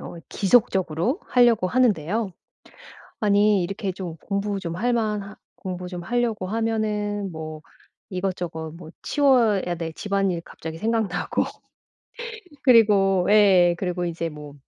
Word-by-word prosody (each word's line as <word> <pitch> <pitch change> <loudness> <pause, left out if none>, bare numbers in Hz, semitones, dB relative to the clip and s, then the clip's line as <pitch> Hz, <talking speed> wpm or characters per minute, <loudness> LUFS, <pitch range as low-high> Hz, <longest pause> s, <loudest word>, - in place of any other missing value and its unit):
어 - - -8
지속적으로 195 - +1
하려고 240 -6 +4
하는데요. 210 -2 +1 0.9
아니 205 -2 +3
이렇게 195 +2 -3
좀 180 -3 -7
공부 200 +1 -2
좀 170 -3 -5
할 245 +6 0
만 215 -3 0
하 200 +1 -11 0.2
공부 180 -2 -6
좀 180 -1 -6
하려고 225 -2 -1
하면은 210 -2 -1
뭐 155 -1 -7 0.5
이것저것 180 -4 -4
뭐 165 -2 -11
치워야 235 -11 +3
될 165 -1 -4
집안일이 195 -4 -1
갑자기 160 0 -8
생각나고. 220 -4 0 1.2
그리고 205 -8 +5
예 190 -5 +6
그리고 180 -1 -2
이제 170 -1 -3
뭐 150 -2 -10
195 Hz, 265 characters per minute, -24 LUFS, 175-215 Hz, 1.2 s, 예